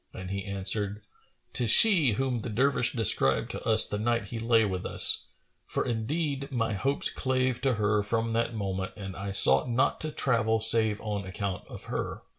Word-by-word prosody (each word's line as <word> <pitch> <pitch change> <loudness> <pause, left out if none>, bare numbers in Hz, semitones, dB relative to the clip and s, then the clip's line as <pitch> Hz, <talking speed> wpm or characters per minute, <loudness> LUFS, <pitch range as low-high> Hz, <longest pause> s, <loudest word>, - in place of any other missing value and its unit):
and 95 0 -8
he 100 0 -4
answered, 100 +1 -4 0.5
"'Tis 120 -3 -2
she 165 - +6
whom 130 +1 -2
the 115 - -6
Dervish 125 +2 0
described 90 - +1
to - - -7
us 110 0 +8
the 105 - -5
night 115 -1 -2
he 115 - -6
lay 115 -1 +2
with 95 -3 -4
us; - - +2 0.4
for - - -3
indeed 140 +4 -4
my 115 -4 -2
hopes 135 +8 0
clave 130 -1 -2
to 135 -2 0
her 105 0 0
from 115 +2 -2
that 115 0 -2
moment 95 -2 -4
and 95 -2 -8
I 100 0 -6
sought 100 +5 +5
not 120 +2 0
to 155 - -3
travel 115 -5 0
save 110 -1 +3
on 105 -2 -4
account 95 0 -6
of - - -10
her. - - -6
110 Hz, 185 wpm, -27 LUFS, 100-125 Hz, 0.5 s, us